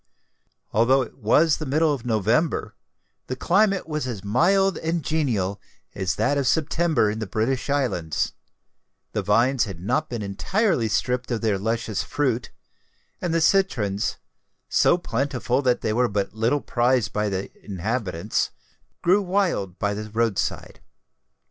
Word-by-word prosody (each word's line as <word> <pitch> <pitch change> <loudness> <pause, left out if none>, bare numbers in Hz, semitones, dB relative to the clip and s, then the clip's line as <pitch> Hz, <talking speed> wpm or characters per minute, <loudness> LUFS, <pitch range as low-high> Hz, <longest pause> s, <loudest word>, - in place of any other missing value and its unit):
Although 130 +5 +4
it 120 - -12
was 150 +8 +4
the 155 - -5
middle 155 +3 +2
of 125 -3 -5
November, 110 - +1 0.5
the 130 - -3
climate 195 +7 +2
was 150 -4 -2
as 110 -6 -5
mild 190 - +2
and 165 0 -1
genial 110 -11 -1 0.3
as 95 -1 -1
that 140 +7 +1
of 135 - 0
September 160 -4 +2
in 110 - -5
the 110 - -4
British 120 +6 -1
Islands: 120 - 0 0.8
the 105 - -1
vines 120 +6 +3
had 95 -5 -7
not 105 - -1
been 120 -3 -4
entirely 145 - 0
stripped 125 +4 -1
of 120 -3 -1
their 105 -4 +1
luscious 115 0 -1
fruit; 125 -5 -1 0.7
and 175 - -1
the 165 0 +1
citrons, 120 - +1 0.5
so 175 - +4
plentiful 135 -4 -1
that 125 -3 +1
they 110 - 0
were 125 +2 +2
but 100 -1 -2
little 115 +6 +1
prized 120 -2 +1
by 105 0 0
the 95 0 -3
inhabitants, 100 -1 -2 0.5
grew 190 +4 +4
wild 180 - 0
by 105 0 0
the 105 +1 -5
road 115 -2 0
side. - - -3
120 Hz, 150 wpm, -24 LUFS, 105-150 Hz, 0.8 s, Although